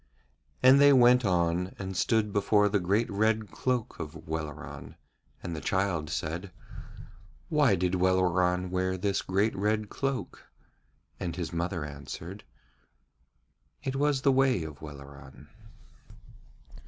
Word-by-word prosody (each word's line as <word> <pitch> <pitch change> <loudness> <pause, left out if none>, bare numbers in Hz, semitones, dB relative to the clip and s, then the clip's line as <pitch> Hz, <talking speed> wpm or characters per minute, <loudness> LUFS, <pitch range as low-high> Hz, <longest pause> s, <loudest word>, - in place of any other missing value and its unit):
And 130 +2 +7
they 145 0 +8
went 125 -1 +6
on 90 0 0
and 95 -1 -5
stood 105 +1 +1
before 105 0 +3
the 100 0 +1
great 100 +6 +1
red 110 -1 0
cloak 125 +5 -2
of 80 0 -8
Welleran, 80 -2 -6 0.5
and 85 -2 -4
the 75 - -6
child 95 -5 -1
said: 85 +6 -4 1.0
'Why 145 -9 +3
did 90 0 -1
Welleran 90 0 +1
wear 95 0 -1
this 100 +1 0
great 100 +4 0
red 105 +1 -1
cloak?' 135 -2 -4 0.7
And 85 -3 -4
his 85 -2 -5
mother 85 -2 -2
answered: 75 +7 -8 1.4
'It 135 - -3
was 140 -1 +1
the 140 - +5
way 130 -8 +2
of 75 -3 -9
Welleran.' 70 -2 -12
95 Hz, 125 wpm, -28 LUFS, 85-110 Hz, 1.4 s, they